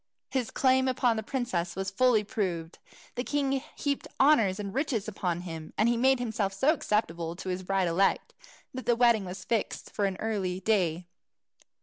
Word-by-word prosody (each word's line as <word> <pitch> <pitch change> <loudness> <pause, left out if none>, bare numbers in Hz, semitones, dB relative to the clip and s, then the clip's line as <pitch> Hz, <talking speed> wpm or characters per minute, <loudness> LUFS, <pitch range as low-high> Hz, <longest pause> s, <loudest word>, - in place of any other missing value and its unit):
His 260 -4 -1
claim 260 0 +3
to 260 - +2 0.2
the 220 - -2
princess 210 -9 -2
was 190 +1 -3
fully 235 +1 +3
proved; 175 -6 -3 0.3
the 245 - -3
king 275 -1 0
heaped 280 -1 -2
honours 225 -9 +4
and 200 -1 -5
riches 255 -6 -1
upon 180 -5 -2
him; 165 -3 -7
and 215 - +3
he 240 - +3
made 260 +3 +4
himself 220 -5 -2
so 270 +11 +3
acceptable 170 - -1
to 190 +1 -6
his 180 0 -2
bride 190 0 0
elect, 185 +4 +1 0.4
that 260 0 -7
the 240 - +4
wedding 235 -4 +4
was 185 +1 -7
fixed 230 -3 -2
for 205 - 0
an 190 -1 -1
early 195 -5 -2
day. 180 -4 +1
210 Hz, 180 wpm, -29 LUFS, 185-245 Hz, 0.4 s, honours